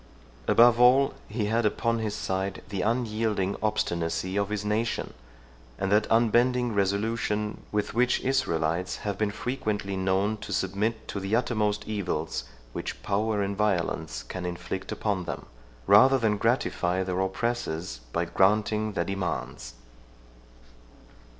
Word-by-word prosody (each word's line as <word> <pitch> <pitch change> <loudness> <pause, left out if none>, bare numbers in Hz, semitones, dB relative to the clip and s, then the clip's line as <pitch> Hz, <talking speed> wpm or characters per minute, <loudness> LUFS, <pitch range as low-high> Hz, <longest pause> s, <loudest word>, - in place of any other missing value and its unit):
Above 120 0 +6
all, 130 +3 +6 0.2
he 105 0 -1
had 115 +3 +1
upon 115 +2 +1
his 110 -2 -2
side 95 +1 -3
the 100 -2 -2
unyielding 110 -3 0
obstinacy 85 -4 -1
of 100 0 0
his 105 -1 -3
nation, 110 +2 -1 0.6
and 95 0 -1
that 105 +1 +4
unbending 120 +1 +3
resolution, 105 +1 0
with 105 -1 -1
which 125 +2 +2
Israelites 85 -9 0
have 100 -1 -1
been 105 +1 0
frequently 105 -3 -3
known 95 +3 +1
to 105 - -8
submit 100 +4 -1
to 100 - -4
the 95 +3 0
uttermost 105 -3 0
evils 90 -7 -2 0.3
which - - -5
power 105 +1 0
and 100 0 -2
violence 90 -6 -1
can 90 - -6
inflict 90 +2 -5
upon 100 -4 -1
them, - - -5 0.4
rather 110 +7 +7
than 110 -4 +1
gratify 95 -5 +1
their 90 0 -2
oppressors 95 - -2
by 85 +5 0
granting 105 +4 +2
their 85 -3 -1
demands. 90 -10 -4
105 Hz, 130 wpm, -27 LUFS, 95-110 Hz, 0.6 s, rather